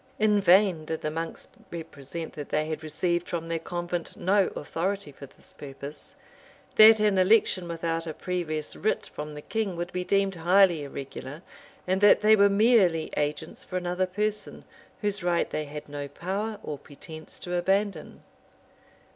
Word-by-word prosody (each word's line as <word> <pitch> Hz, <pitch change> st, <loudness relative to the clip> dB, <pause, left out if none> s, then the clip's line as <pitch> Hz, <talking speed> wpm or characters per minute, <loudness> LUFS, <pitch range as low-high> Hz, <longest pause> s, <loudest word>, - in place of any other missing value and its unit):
] -, -, -34 dB
In 210 Hz, -1 st, +3 dB
vain 185 Hz, -3 st, +4 dB
did 160 Hz, 0 st, -4 dB
the 155 Hz, -, -2 dB
monks 165 Hz, +1 st, -5 dB, 0.2 s
represent, 165 Hz, -1 st, -7 dB
that 145 Hz, -2 st, -7 dB
they 155 Hz, 0 st, 0 dB
had 155 Hz, 0 st, -4 dB
received 170 Hz, +3 st, -1 dB
from 165 Hz, -1 st, -3 dB
their 165 Hz, 0 st, -1 dB
convent 175 Hz, 0 st, -4 dB
no 195 Hz, +2 st, +3 dB
authority 180 Hz, +2 st, -3 dB
for 140 Hz, 0 st, -11 dB
this -, -, -14 dB
purpose; 140 Hz, +1 st, -9 dB, 0.6 s
that 220 Hz, 0 st, +9 dB
an 210 Hz, -3 st, +3 dB
election 185 Hz, -2 st, +3 dB
without 165 Hz, 0 st, -3 dB
a 160 Hz, -, -3 dB
previous 160 Hz, -4 st, -3 dB
writ 215 Hz, -, -1 dB
from 150 Hz, 0 st, -6 dB
the 150 Hz, -, -8 dB
king, 215 Hz, -5 st, -2 dB
would 175 Hz, +1 st, -5 dB
be 180 Hz, 0 st, -1 dB
deemed 195 Hz, +1 st, +1 dB
highly 175 Hz, -1 st, +4 dB
irregular 140 Hz, +2 st, -8 dB, 0.4 s
and 185 Hz, +1 st, 0 dB
that 205 Hz, 0 st, +6 dB
they 215 Hz, 0 st, +6 dB
were 200 Hz, -1 st, +5 dB
merely 200 Hz, -6 st, +3 dB
agents 150 Hz, -, -3 dB
for 185 Hz, -, -4 dB
another 180 Hz, +1 st, -1 dB
person, 210 Hz, +2 st, -3 dB, 0.4 s
whose 205 Hz, -2 st, -1 dB
right 175 Hz, -1 st, +1 dB
they 155 Hz, -, -2 dB
had 150 Hz, +1 st, -8 dB
no 145 Hz, -1 st, -5 dB
power 200 Hz, +8 st, -4 dB
or 145 Hz, -2 st, -5 dB
pretence 155 Hz, +2 st, -11 dB
to 180 Hz, -, -6 dB
abandon. 190 Hz, 0 st, -1 dB
175 Hz, 165 wpm, -27 LUFS, 155-195 Hz, 0.6 s, that